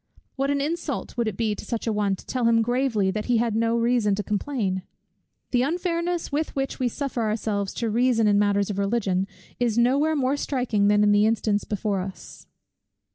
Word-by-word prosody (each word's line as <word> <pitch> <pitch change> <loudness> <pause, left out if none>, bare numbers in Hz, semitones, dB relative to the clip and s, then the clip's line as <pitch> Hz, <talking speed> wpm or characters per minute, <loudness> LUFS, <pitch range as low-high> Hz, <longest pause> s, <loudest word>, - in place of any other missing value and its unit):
What 275 0 -1
an 285 0 +1
insult 310 -1 -3
would 235 -2 0
it 210 - -3
be 220 -2 0
to - - -8
such 230 -2 -4
an 225 - 0
one, 205 -2 +1
to - - -15
tell 250 -2 -1
him 230 -1 +4
gravely 240 -5 +1
that 210 +2 -3
he 245 -2 +2
had 230 -1 0
no 230 +1 +1
reason 230 -3 +2
to 210 - -3
complain! 205 -3 -2 0.7
The 245 - +3
unfairness, 340 +3 -1
with 305 +2 -2
which 270 -1 -2
we 255 - +1
suffer 260 0 -3
ourselves 210 -2 -1
to 230 - -1
reason 235 0 +2
in 205 -1 +4
matters 205 0 +2
of 200 - -4
Religion, 195 -2 0 0.3
is 235 -2 +1
no 250 +4 +4
where 315 +1 +2
more 275 0 +1
striking 245 -8 0
than 205 0 +4
in 205 - +4
the 205 +1 +4
instance 215 -2 0
before 205 -1 -1
us. 185 +1 -8
230 Hz, 205 wpm, -25 LUFS, 205-255 Hz, 0.7 s, him